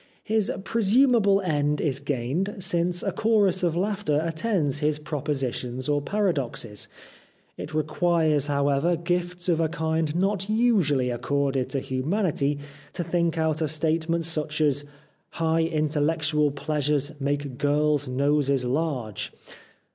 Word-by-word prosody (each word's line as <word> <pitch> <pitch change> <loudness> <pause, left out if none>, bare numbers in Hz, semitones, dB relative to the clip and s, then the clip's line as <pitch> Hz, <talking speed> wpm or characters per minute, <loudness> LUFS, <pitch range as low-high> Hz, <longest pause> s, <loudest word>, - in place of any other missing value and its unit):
His 220 +1 +1
presumable 225 -2 +3
end 150 -4 0
is 140 -4 0
gained, 140 +8 -2
since 175 -1 0
a - - 0
chorus 210 -4 +2
of 170 -3 +1
laughter 190 -5 0
attends 160 - 0
his 150 0 +1
propositions 135 -4 -3
or 145 -1 +1
paradoxes. 140 - -2 0.7
It - - -7
requires, 155 -1 +1
however, 140 +4 +2
gifts 175 +1 -2
of 170 -2 +2
a 160 -1 +1
kind 160 -1 -1
not 195 +2 0
usually 190 - +2
accorded 135 +1 -1
to 140 - -1
humanity 145 +1 0 0.4
to 175 - -2
think 170 0 0
out 160 -1 0
a 155 - +1
statement 160 +2 0
such 155 -2 -1
as 145 -2 +1 0.3
' - - -42
High 160 0 +2
intellectual 155 -1 +1
pleasures 145 0 -1
make 140 -2 -2
girls' 145 0 +1
noses 140 0 +1
large 125 - -2
155 Hz, 125 wpm, -25 LUFS, 145-175 Hz, 0.7 s, presumable